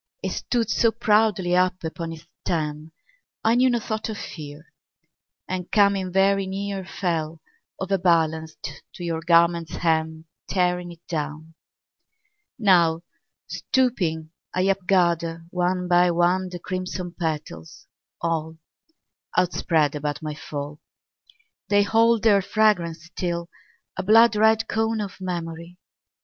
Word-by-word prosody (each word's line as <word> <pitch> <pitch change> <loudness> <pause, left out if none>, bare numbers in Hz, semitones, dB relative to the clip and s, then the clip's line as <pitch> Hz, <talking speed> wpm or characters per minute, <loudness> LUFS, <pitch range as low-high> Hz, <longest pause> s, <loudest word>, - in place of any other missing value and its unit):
It - - -1
stood 230 -3 -1
so 230 +3 +3
proudly 210 -5 +2
up 185 0 +1
upon 165 +1 -4
its 165 0 -10 0.2
stem, 155 -2 -2 0.5
I 225 - +4
knew 255 +2 +4
no 240 - +2
thought 220 0 -4
of 215 - -4
fear, 150 -2 -9 0.7
And 185 -1 -4
coming 200 -3 +3
very 195 +1 +3
near 195 0 -4
Fell, 165 -4 -3 0.4
overbalanced, 160 -5 0
to 175 - -8
your 165 -1 -2
garment's 170 0 +3
hem, 160 -1 0 0.2
Tearing 180 -1 0
it 170 0 -15
down. 155 0 -4 1.0
Now, 170 -7 +4 0.4
stooping, 170 -12 -1 0.2
I 185 - +2
upgather, 170 -4 +1
one 180 0 0
by 175 0 +4
one, 175 +2 +2
The 180 - -6
crimson 180 0 -5
petals, 150 - -5 0.3
all 160 -1 -2 0.8
Outspread 165 -4 +2
about 150 0 -4
my 155 -1 -3
fall. 145 0 -6 0.9
They 205 0 +4
hold 225 +2 +3
their 205 -3 +5
fragrance 180 -6 +1
still, 170 0 -4 0.4
a - - -2
blood 225 +3 +6
red 220 +1 +3
cone 225 0 0
Of 200 -2 -6
memory. 170 -1 -5
175 Hz, 120 wpm, -24 LUFS, 160-195 Hz, 1.0 s, blood